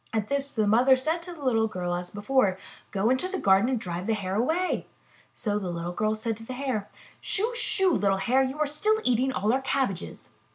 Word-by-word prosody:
At 215 Hz, -2 st, -1 dB
this, 280 Hz, 0 st, 0 dB
the 215 Hz, -2 st, +2 dB
mother 245 Hz, +6 st, +5 dB
said 315 Hz, +6 st, -1 dB
to 355 Hz, +1 st, -8 dB
the 305 Hz, -4 st, -11 dB
little 225 Hz, -3 st, +3 dB
girl 180 Hz, -4 st, -3 dB
as 175 Hz, 0 st, -3 dB
before: 205 Hz, -2 st, +1 dB, 0.3 s
*'Go 205 Hz, +5 st, +1 dB
into 260 Hz, +8 st, +1 dB
the 380 Hz, +1 st, -3 dB
garden 195 Hz, -, +4 dB
and 255 Hz, -3 st, 0 dB
drive 180 Hz, 0 st, -5 dB
the 225 Hz, -, +2 dB
Hare 190 Hz, -3 st, -4 dB
away." 320 Hz, -, 0 dB, 0.5 s
So 210 Hz, -2 st, -1 dB
the 190 Hz, -3 st, -4 dB
little 170 Hz, 0 st, -4 dB
girl 215 Hz, +4 st, 0 dB
said 225 Hz, +1 st, -3 dB
to 225 Hz, -, -10 dB
the 255 Hz, -, -6 dB
Hare: 250 Hz, -6 st, -3 dB, 0.3 s
Shoo! 450 Hz, +5 st, 0 dB
Shoo! 385 Hz, -6 st, +2 dB
little 195 Hz, -6 st, +2 dB
Hare, 245 Hz, +7 st, +2 dB
you 265 Hz, +2 st, -1 dB
are 305 Hz, -, +2 dB
still 425 Hz, +10 st, +1 dB
eating 255 Hz, +2 st, +2 dB
all 220 Hz, -2 st, 0 dB
our 265 Hz, -, +1 dB
cabbages." 250 Hz, -, -2 dB
230 Hz, 220 wpm, -27 LUFS, 200-275 Hz, 0.5 s, mother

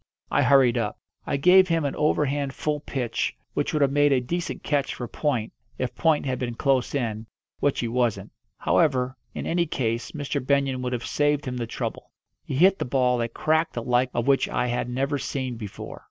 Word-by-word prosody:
I -, -, +3 dB
hurried 130 Hz, -4 st, +5 dB
up. 105 Hz, -3 st, -2 dB, 0.3 s
I -, -, 0 dB
gave 185 Hz, +6 st, +6 dB
him 165 Hz, -3 st, +1 dB
an 140 Hz, -, -2 dB
overhand 145 Hz, -2 st, 0 dB
full 150 Hz, -1 st, -1 dB
pitch 130 Hz, -5 st, -2 dB, 0.2 s
which -, -, -1 dB
would 150 Hz, -2 st, +2 dB
have 135 Hz, -, +2 dB
made 145 Hz, 0 st, +4 dB
a 135 Hz, -, +4 dB
decent 170 Hz, +8 st, -4 dB
catch 140 Hz, -2 st, 0 dB
for 120 Hz, -, -5 dB
point, 125 Hz, -7 st, -2 dB, 0.2 s
if 130 Hz, -, -2 dB
point 160 Hz, -3 st, +2 dB
had 130 Hz, -2 st, -1 dB
been 120 Hz, -2 st, -3 dB
close 135 Hz, +1 st, +1 dB
in, 110 Hz, -4 st, -2 dB, 0.3 s
which 145 Hz, -, +1 dB
he 120 Hz, -, -1 dB
wasn't. 120 Hz, -1 st, -1 dB, 0.3 s
However, 130 Hz, -5 st, +2 dB, 0.2 s
in -, -, -4 dB
any 170 Hz, 0 st, +1 dB
case 120 Hz, -5 st, -2 dB
Mr. 145 Hz, -2 st, -3 dB
Benyon 135 Hz, -1 st, +1 dB
would 125 Hz, 0 st, -2 dB
have 120 Hz, -1 st, -3 dB
saved 145 Hz, 0 st, +1 dB
him 125 Hz, -1 st, -3 dB
the 120 Hz, -1 st, -3 dB
trouble. -, -, -5 dB, 0.3 s
He -, -, -4 dB
hit 185 Hz, +7 st, +5 dB
the -, -, 0 dB
ball 125 Hz, -1 st, +2 dB
a 115 Hz, -, 0 dB
crack 160 Hz, +7 st, 0 dB
the 120 Hz, -, -4 dB
like 125 Hz, +1 st, +2 dB
of 120 Hz, -1 st, -1 dB
which 135 Hz, -1 st, +3 dB
I -, -, 0 dB
had 120 Hz, 0 st, -1 dB
never 135 Hz, +3 st, -1 dB
seen 130 Hz, -3 st, -3 dB
before. 105 Hz, -4 st, -8 dB
135 Hz, 205 wpm, -25 LUFS, 125-145 Hz, 0.3 s, gave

